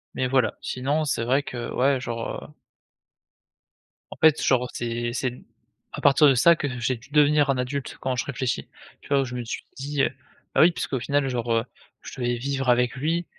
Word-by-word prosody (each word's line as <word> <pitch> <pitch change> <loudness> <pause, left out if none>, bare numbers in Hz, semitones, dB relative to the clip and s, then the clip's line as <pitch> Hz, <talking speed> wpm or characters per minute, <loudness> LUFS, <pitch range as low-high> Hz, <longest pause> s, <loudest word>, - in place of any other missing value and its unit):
Mais 130 - 0
voilà. 125 -4 +1
Sinon 140 +5 -1
c'est 125 -5 -1
vrai 130 +4 +2
que 120 -4 -6
ouais 135 +1 +2
genre, 115 -2 -5
heu - - -11 1.6
en - - -9
fait 155 -1 +4
genre 125 -1 +2
c'est 120 0 -3
c'est 125 -1 -3 0.5
à - - -6
partir 145 +1 +6
de 135 - +5
ça 170 +7 +6
que 145 - -3
j'ai 120 +1 0
dû 125 +4 -18
devenir 150 0 +4
un 135 - +2
adulte, 130 +2 -4
quand 130 -1 -2
je 125 - -1
réfléchis. 130 -2 -3 0.3
Tu - - -16
vois? 140 -1 +3
Où - - -1
je 125 - -8
me 125 - -3
suis 115 - -5
dit, 140 +1 -1
heu - - +3 0.5
bah - - +5
oui 170 - +7
puisqu'au 135 -5 -3
final 140 +2 0
genre, 120 -2 -2
heu, 115 +1 +1 0.4
je - - -9
devais 120 -1 0
vivre 135 +1 -2
avec 125 0 +3
lui, 165 +6 -1
130 Hz, 205 wpm, -25 LUFS, 120-140 Hz, 1.6 s, oui